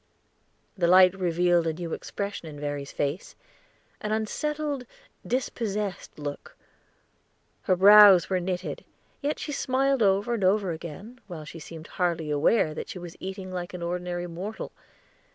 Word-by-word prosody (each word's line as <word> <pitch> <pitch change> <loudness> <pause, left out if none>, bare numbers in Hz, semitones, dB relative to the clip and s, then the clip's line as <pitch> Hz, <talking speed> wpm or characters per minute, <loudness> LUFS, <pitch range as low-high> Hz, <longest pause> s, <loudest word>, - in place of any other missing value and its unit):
The 175 -4 +1
light 185 +1 +7
revealed 175 -2 +2
a 160 - 0
new 170 0 -5
expression 200 -4 -5
in 150 -2 -9
Verry's 145 -1 -4
face 145 +6 -3 0.6
an 210 - -4
unsettled, 285 +5 -2 0.4
dispossessed 210 -6 -3
look; 145 -1 -7 1.1
her 185 - +6
brows 200 -1 +8
were 185 -1 0
knitted, 180 0 -4 0.4
yet 295 +1 -1
she 300 - -5
smiled 270 -1 +1
over 200 +3 +3
and 220 -4 -1
over 190 0 +3
again, 170 +9 -8
while 165 -5 -7
she 165 +2 -9
seemed 160 0 -10
hardly 170 -4 -1
aware 155 +3 +3
that - - -6
she - - -6
was 175 -1 -8
eating 190 0 -6
like 180 0 -5
an 175 - -6
ordinary 175 0 -3
mortal. 180 +6 -6
185 Hz, 145 wpm, -27 LUFS, 170-210 Hz, 1.1 s, brows